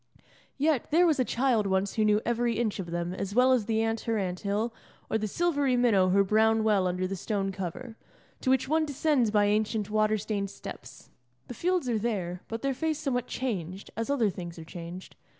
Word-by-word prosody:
Yet, 290 -2 +1
there 340 +4 +5
was 310 -4 +2
a - - +4
child 240 -4 +1
once 190 +1 0
who 220 - +1
knew 210 0 +3
every 235 -1 0
inch 220 -4 -1
of 175 -3 -5
them 175 +1 -2
as 195 +2 -4
well 255 +1 +5
as 230 -5 +1
the 220 -1 +1
ant 225 0 0
her 230 -1 0
anthill, 200 +4 -2 0.4
or 220 - +2
the 215 - -2
silvery 285 - +1
minnow 205 -7 +4
her 200 +2 +4
brown 220 +2 +3
well 205 -4 +3
under 180 +1 -1
the 195 +1 -3
stone 195 0 -2
cover, 195 +6 -6 0.4
to 260 - -1
which 260 0 +3
one 315 +2 +2
descends 285 -4 +1
by 210 -1 +3
ancient 210 0 0
water 215 0 +2
stained 200 -1 -3
steps. - - -10 0.4
The - - -4
fields 355 +3 0
are 230 -3 +1
there, 185 -6 -2
but 225 0 -5
their 275 0 +1
face 310 +3 -1
somewhat 260 -5 -2
changed, 195 -7 -4
as 230 +3 -3
other 240 -8 +2
things 175 -2 -8
are 160 - -9
changed. 175 +2 -9
220 Hz, 205 wpm, -28 LUFS, 195-250 Hz, 0.4 s, there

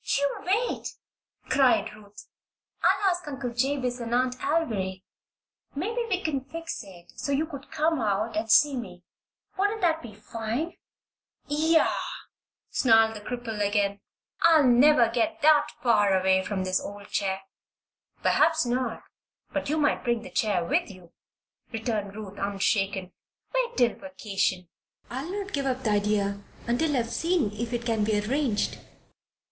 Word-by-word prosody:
"You 280 0 0
wait!" 430 +7 -1 0.5
cried 265 -3 +3
Ruth. 205 -1 -14 0.6
"I'll 390 -2 +3
ask 355 -2 -4
Uncle 265 -4 -4
Jabez 255 0 -1
and 235 0 -2
Aunt 250 0 +2
Alviry. 210 - -1 0.7
Maybe 440 +11 -2
we 375 -2 0
can 280 -5 -1
fix 330 -1 -6
it 175 -3 -14
so 280 - -3
you 285 +3 +1
could 285 -3 -10
come 315 -2 +1
out 215 +1 0
and 220 +1 -2
see 290 +4 +6
me. 180 -8 -7 0.6
Wouldn't 410 +2 +1
that 325 -3 +2
be 220 -4 -10
fine?" 230 +9 -4 0.7
"Yah!" 315 +2 +3 0.8
snarled 225 -2 +4
the 210 - -7
cripple 235 -1 -5
again. 200 0 +1 0.4
"I'll 325 -3 +6
never 250 +1 +6
get 245 +9 -1
that 300 -1 +6 0.2
far 205 -5 +4
away 190 0 +3
from 190 -1 -2
this 185 0 0
old 205 0 -9
chair." 195 -1 -1 0.8
"Perhaps 320 -1 +3
not; 245 -1 -2 0.5
but 290 - -2
you 310 - +1
might 295 -1 +1
bring 235 -2 0
the - - -10
chair 195 -6 +1
with 320 - +1
you," 185 -4 -14 0.6
returned 220 -4 -3
Ruth, 205 -2 -8
unshaken. 195 -1 0 0.4
"Wait - - 0
till 240 -1 +4
vacation. 195 -9 -2 0.4
I'll 270 +8 -4
not 395 0 -5
give 275 -1 -1
up 260 0 -1
the 215 - +1
idea 205 -1 +1 0.2
until 275 +5 +1
I've 235 -1 -1
seen 330 - +1
if 230 +2 -4
it 240 -1 -3
can't 225 -3 +1
be 215 -1 +2
arranged." 245 +1 -1
240 Hz, 150 wpm, -27 LUFS, 205-295 Hz, 0.8 s, see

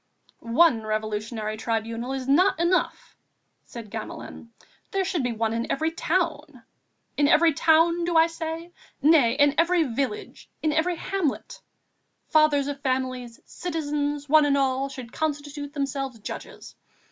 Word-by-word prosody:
"One 235 +1 +3
Revolutionary 215 0 -3
Tribunal 230 +2 -3
is 265 -1 -4
not 340 +6 +3
enough," 345 +2 0 0.5
said 230 -4 -10
Gamelin, 225 +1 -8 0.4
"there 390 -1 -1
should 360 -4 -1
be 245 -1 -1
one 225 0 -1
in 230 +1 -2
every 315 +3 0
town... 315 -6 -2 0.5
in 290 - +4
every 325 +2 +5
town, 330 +3 +3
do 340 -1 +1
I 320 - +7
say? 330 +1 -5 0.3
nay, 290 -6 +5
in 285 +1 +4
every 340 0 +3
village, 280 - -4
in 310 -1 +2
every 335 +3 +1
hamlet. 390 - -3 0.7
Fathers 305 -3 +4
of 285 -1 -5
families, 255 -3 -3
citizens, 295 -4 -3
one 305 0 +5
and 280 -1 +2
all, 270 0 0
should 255 -3 -9
constitute 290 -1 -4
themselves 275 -3 -3
judges. 215 - -9
285 Hz, 135 wpm, -25 LUFS, 245-325 Hz, 0.7 s, I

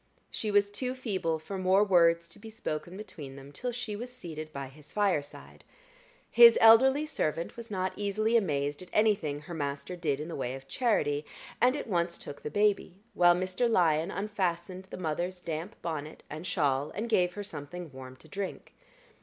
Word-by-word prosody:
She 215 - -3
was 205 0 +3
too 250 +5 -3
feeble 190 -10 -1
for 190 +5 -6
more 185 +2 +4
words 170 -4 +4
to 185 - -13
be 220 +2 -10
spoken 175 -4 -5
between 145 -10 -9
them 140 +1 -11
till 250 +11 -4
she 240 -3 -4
was 240 +4 -6
seated 155 -10 -8
by 140 -2 -5
his 150 +2 -15
fireside. 190 -9 -2 0.7
His 235 -1 +9
elderly 265 +6 +7
servant 165 - -2
was 235 -1 -9
not 185 -2 -1
easily 215 +3 0
amazed 145 -8 +1
at 180 - -11
anything 195 -10 +2
her 165 +3 -9
master 145 +2 -3
did 150 -5 -1
in 150 - -5
the 170 - -5
way 130 -1 -3
of 135 0 -11
charity, 150 - +1 0.4
and 255 +2 +5
at - - -4
once 170 -4 0
took 145 - -9
the - - -4
baby, 205 -1 +1 0.2
while 175 0 +6
Mr. 185 +6 0
Lyon 165 -5 +3
unfastened 190 -3 -2
the - - -9
mother's 175 +2 -2
damp 170 +4 -5
bonnet 155 -2 -5
and 155 +4 -6
shawl, 145 -4 +1
and 220 +4 -2
gave 180 -6 +2
her 205 - -5
something 165 -1 -7
warm 130 -1 -9
to 130 - -18
drink. 195 +4 -6
180 Hz, 185 wpm, -30 LUFS, 155-210 Hz, 0.7 s, His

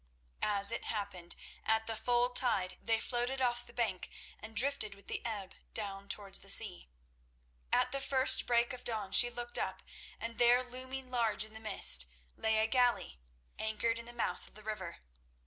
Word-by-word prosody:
As 200 0 +3
it 235 - -3
happened, 200 -5 -4 0.3
at 220 0 +1
the 225 - -3
full 245 +2 +2
tide 210 -7 +2
they 225 -1 +1
floated 245 +3 -1
off 240 -1 0
the - - -13
bank 215 -7 -2 0.3
and 220 +1 -10
drifted 235 -4 +2
with 200 -1 -19
the - - -4
ebb 205 -5 -5 0.2
down 200 -2 -2
towards 200 -2 -1
the 195 - -10
sea. 195 - +2 0.8
At 255 - +2
the 275 +1 -3
first 265 0 +4
break 235 0 +2
of 250 - -9
dawn 215 -5 -4
she 240 - +8
looked 240 0 -4
up, - - -4 0.4
and 230 0 -6
there, 245 +1 +5
looming 255 +1 -7
large 230 -4 +1
in 215 0 -12
the 220 - -9
mist, 65 - +5 0.3
lay 220 0 +1
a 220 - +3
galley, 240 - +1 0.4
anchored 230 +1 -1
in 235 - -9
the - - -6
mouth 240 -1 -3
of - - -20
the 215 - -12
river. 190 - -6
225 Hz, 180 wpm, -33 LUFS, 205-245 Hz, 0.8 s, she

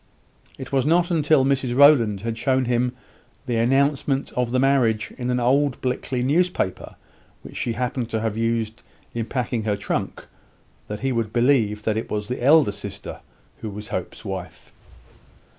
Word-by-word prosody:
It 130 - -8
was 135 -2 +2
not 170 +2 +4 0.2
till 145 -3 +4
Mrs 135 -3 0
Rowland 125 -8 +5
had 115 +1 -3
shown 130 +2 +1
him 125 +1 0 0.5
the 120 -3 -1
announcement 135 +3 +1
of 125 -1 -1
the 130 - 0
marriage 125 -5 +2
in 125 -2 -4
an 125 0 +1
old 135 +2 +2
Blickley 125 0 -2
newspaper, 160 - 0 0.5
which - - -11
she 115 - -2
happened 125 0 -2
to 110 - -1
have 110 -1 -2
used 115 0 -1 0.3
in 115 -1 -3
packing 125 -3 -2
her 105 -2 0
trunk, 100 - -3 0.6
that 105 0 -6
he 135 +1 0
would 115 -3 -1
believe 120 -4 +2
that 110 0 0
it 110 - -4
was 105 0 -3
the 125 -1 -3
elder 145 -4 +5
sister 100 -1 -8 0.4
who 110 - -5
was 105 +2 -8
Hope's 90 +4 -5
wife. 95 -2 -7
120 Hz, 165 wpm, -23 LUFS, 110-135 Hz, 0.6 s, Rowland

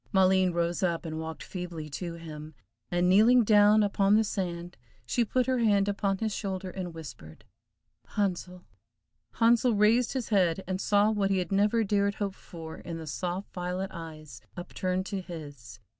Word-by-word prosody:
Maleen 190 -1 +4
rose 170 0 -1
up, 170 -2 0
and 160 -1 -4
walked 160 0 -6
feebly 175 -4 -6
to 170 +4 -5
him, 155 -2 -9 0.3
and 175 0 +1
kneeling 225 +6 +6
down 210 0 +5
upon 200 0 +3
the 220 - +4
sand, 175 -4 -4 0.3
she 240 - +1
put 250 +3 0
her 260 -1 +1
hand 205 -3 +3
upon 200 -1 0
his 220 +1 -2
shoulder, 190 -2 -4
and 180 -2 -5
whispered 135 - -11 0.7
"Handsel!" 180 -3 -2 0.7
Handsel 235 0 +3
raised 220 +4 +3
his 260 -4 -3
head, 190 -3 +2
and 185 0 -2
saw 205 +1 +3
what 205 -2 0
he 195 - +2
had 185 +2 -2
never 210 +3 +3
dared 200 -1 +1
hope 200 -2 -3
for, 165 -4 -10
in 170 -1 -7
the 160 - -7
soft 180 +5 -4
violet 180 +1 -3
eyes 155 -3 -9 0.2
upturned 185 +1 -2
to 195 -1 -4
his. 145 -9 -10
190 Hz, 170 wpm, -28 LUFS, 170-205 Hz, 0.7 s, kneeling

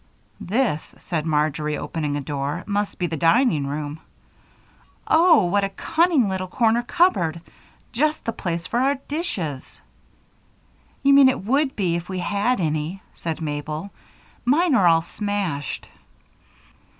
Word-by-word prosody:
"This," 210 - -1
said 165 -2 -3
Marjory, 150 0 0
opening 150 -3 -3
a - - -3
door, 140 +1 -3
"must 205 0 -2
be 180 - -1
the 165 - -2
dining 165 - +3
room. 145 +1 -4 1.1
Oh! 325 - +5
What 200 +3 +1
a 195 - 0
cunning 315 - +2
little 190 -1 -2
corner 230 +4 +2
cupboard 190 - +1 0.5
just 300 +6 0
the 230 - 0
place 170 -5 -3
for 235 - -1
our 275 +2 +2
dishes." 185 - -4 1.2
"You 280 0 +5
mean 275 -1 +8
it 255 - -2
would 270 +4 +1
be 180 -5 0
if 170 +1 -5
we 185 - -3
had 205 +6 0
any," 155 +3 -2
said 165 -1 -5
Mabel. 155 +4 -4 0.5
"Mine 300 +6 +3
are 195 -8 +5
all 165 -1 +4
smashed." 195 -7 -3
185 Hz, 140 wpm, -23 LUFS, 155-245 Hz, 1.2 s, mean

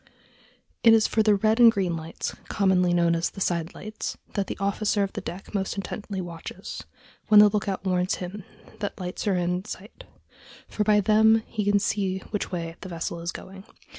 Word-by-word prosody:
It 225 -1 +7
is 220 - +4
for 220 - +2
the 210 -1 +4
red 220 +3 +2
and 235 -1 +9
green 190 -5 -1
lights, 160 0 -5 0.2
commonly 185 -3 +2
known 170 -1 +3
as 165 +1 0
the - - -11
side 170 -3 -1
lights, 215 +1 -6 0.2
that 200 -2 -1
the - - -5
officer 200 +1 +1
of 195 - -3
the - - -4
deck 185 +5 -8
most 195 -2 -1
intently 195 0 -5
watches 170 -2 -7 0.4
(when 210 -1 +8
the 210 0 +8
lookout 200 -1 -2
warns 180 0 +1
him 185 +3 -7 0.4
that 205 0 -4
lights 180 +2 -5
are 195 - +3
in 180 +1 -1
sight), 205 0 -10 0.6
for 210 - -1
by 210 0 +4
them 220 +2 +4
he 215 -2 -3
can 205 0 +3
tell 195 -2 -1
which 210 -2 -3
way 170 -2 -4
the 190 - -7
vessel 170 0 -4
is 170 +1 -3
going. 190 +1 -10
195 Hz, 195 wpm, -26 LUFS, 180-210 Hz, 0.6 s, and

